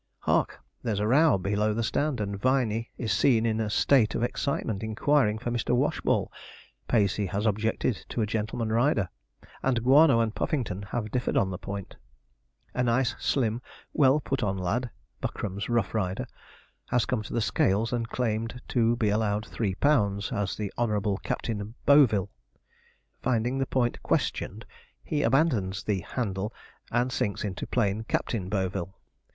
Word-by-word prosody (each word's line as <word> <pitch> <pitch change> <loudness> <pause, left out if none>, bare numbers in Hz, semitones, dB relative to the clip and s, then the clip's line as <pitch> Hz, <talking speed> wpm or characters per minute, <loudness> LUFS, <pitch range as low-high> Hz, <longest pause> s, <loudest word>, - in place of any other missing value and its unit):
Hark! - - +1 0.2
there's 110 -5 -1
a 105 - 0
row 145 +4 +5
below 105 +3 0
the 115 - 0
stand, 140 +3 0
and 100 -1 -2
Viney 115 0 +1
is 110 -5 -1
seen 115 +3 +3
in 110 -1 +1
a 110 -1 -1
state 115 +1 +3
of 115 - 0
excitement 120 -5 -1
inquiring 110 +1 +2
for 120 +2 -4
Mr. 120 +1 0
Washball. 140 +4 +1 0.6
Pacey 100 -3 +2
has 100 +4 -2
objected 110 +1 0
to 115 - -1
a - - +1
gentleman 110 +1 -2
rider, 115 - +2 0.5
and 125 -3 +1
Guano 135 0 +6
and 115 -2 +1
Puffington 115 -11 -2
have 110 -3 -3
differed 125 -1 0
on 95 -1 +2
the 90 - -5
point. 100 -1 -7 0.8
A 125 - 0
nice, 125 +1 +2
slim, 120 -3 0 0.3
well 135 +1 +4
put 135 -2 -2
on 95 -2 0
lad 110 +7 -1 0.3
(Buckram's 100 +1 -4
rough 120 -4 +1
rider) 95 -4 -1 0.6
has 120 -2 +2
come 125 -4 -1
to 105 - -8
the - - +1
scales 110 +1 +1
and 115 -1 -1
claimed 115 0 -2
to 115 -1 +2
be 110 -3 +1
allowed 105 0 0
3 100 -5 -2
lb. 100 -8 +2
as 100 -2 -1
the 105 -2 -4
Honourable 105 -4 +1
Captain 110 0 -4
Boville. 130 -10 +5 0.9
Finding 125 +1 0
the 135 - 0
point 120 -2 0
questioned, - - -1 0.4
he 150 - -1
abandons 115 - +1
the 105 -3 0
'handle', 100 +1 -3 0.4
and 120 +2 +1
sinks 100 -5 -1
into 100 -3 -4
plain 110 -2 0
Captain 100 -4 -2
Boville. 95 -2 -2
110 Hz, 155 wpm, -27 LUFS, 100-125 Hz, 0.9 s, Guano